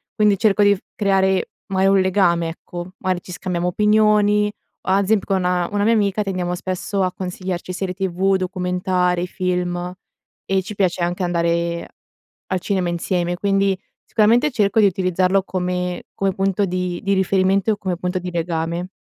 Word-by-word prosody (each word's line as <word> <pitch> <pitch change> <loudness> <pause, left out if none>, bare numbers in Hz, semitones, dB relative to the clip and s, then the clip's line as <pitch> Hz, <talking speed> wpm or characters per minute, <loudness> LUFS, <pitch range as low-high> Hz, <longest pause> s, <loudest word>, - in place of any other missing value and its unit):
quindi 210 -2 +3
cerco 210 0 +3
di 205 0 +5
f - - -11 0.2
creare 190 -2 +2 0.2
magari 195 0 +3
un 195 - +4
legame, 175 -3 +2
ecco, 175 +2 -8
magari 185 -2 -1
ci 180 - -11
scambiamo 180 -1 -2
opinioni 210 +1 +3 0.3
o - - -6
ad 195 +1 +3
esemp 205 0 +2
con 195 - 0
una 180 +2 0
mia 225 +2 +4
amica 210 -1 +1
tendiamo 180 -3 -2
spesso 185 +2 -2
a 185 -1 -1
consigliarci 185 -1 -4
serie 180 0 -3
TV, 190 +1 0
documentari, 180 -1 0
film 180 -1 -2 0.5
e 195 0 +1
ci 200 - -7
piace 185 -3 +1
anche 175 +2 -1
andare 170 -1 0 0.6
al 185 - -1
cinema 185 -1 -1
insieme, 175 0 -1
quindi 195 0 +1 0.3
sicuramente 235 +6 +3
cerco 210 -3 +2
di 210 - +6
utilizzarlo 185 0 +2
come 180 -1 -2
come 195 -1 0
punto 195 +1 +1
di 180 -1 -3
di 200 - +1
riferimento 190 +2 +2
e 210 - -1
come 185 -4 -3
punto 180 +1 -2
di 180 0 -5
legame. 170 +1 -2
185 Hz, 165 wpm, -21 LUFS, 180-195 Hz, 0.6 s, di